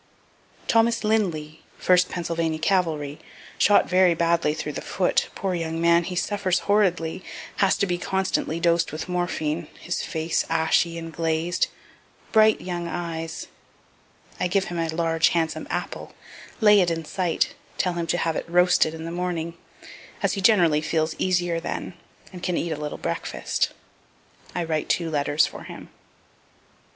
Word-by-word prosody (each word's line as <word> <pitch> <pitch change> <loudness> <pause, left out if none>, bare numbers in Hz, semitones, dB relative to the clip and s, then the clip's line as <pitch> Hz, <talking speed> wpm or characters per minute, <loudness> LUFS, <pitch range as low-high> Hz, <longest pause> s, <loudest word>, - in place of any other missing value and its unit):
Thomas 230 0 +3
Lindly, 170 -8 0 0.2
1st 180 0 +4
Pennsylvania 165 -2 -2
cavalry, 155 -5 0 0.4
shot 205 - +5
very 180 -1 +4
badly 165 -2 +2
through 150 - -4
the - - -5
foot 180 -1 0
poor 190 -1 -2
young 165 -1 -2
man, 170 0 +4
he 180 - -4
suffers 190 -1 0
horridly, 185 -5 +1 0.3
has 195 -1 +3
to - - +2
be 175 -2 -1
constantly 190 -3 -1
dosed 170 0 +2
with 155 +4 -5
morphine, 170 -3 -2
his 175 - -3
face 160 0 -1
ashy 165 +1 +2
and 165 -1 -7
glazed, 165 +2 0 0.6
bright 220 -1 +5
young 175 -1 -4
eyes 165 -2 -4 0.9
I - - +1
give 190 +2 +1
him 170 - -2
a 165 -1 -1
large 165 0 +2
handsome 160 -1 -1
apple, - - -4 0.5
lay 210 -1 +7
it 175 - +2
in 165 -1 -3
sight, 175 0 0 0.2
tell 180 - +1
him 170 -1 -3
to 175 - +1
have 165 -2 0
it - - -4
roasted 175 -2 +4
in 160 0 -7
the 165 - -4
morning, 170 -2 -2 0.7
as - - +2
he 195 - -2
generally 175 -7 +4
feels 155 +1 0
easier 175 -2 +1
then, - - -4 0.4
and 180 - -8
can 180 -1 -1
eat 170 - -2
a - - 0
little 150 - -4
breakfast. - - -2 0.9
I 175 - 0
write 160 -2 -2
two 165 -2 0
letters 145 0 +2
for - - -8
him. - - -10
170 Hz, 155 wpm, -24 LUFS, 160-180 Hz, 0.9 s, lay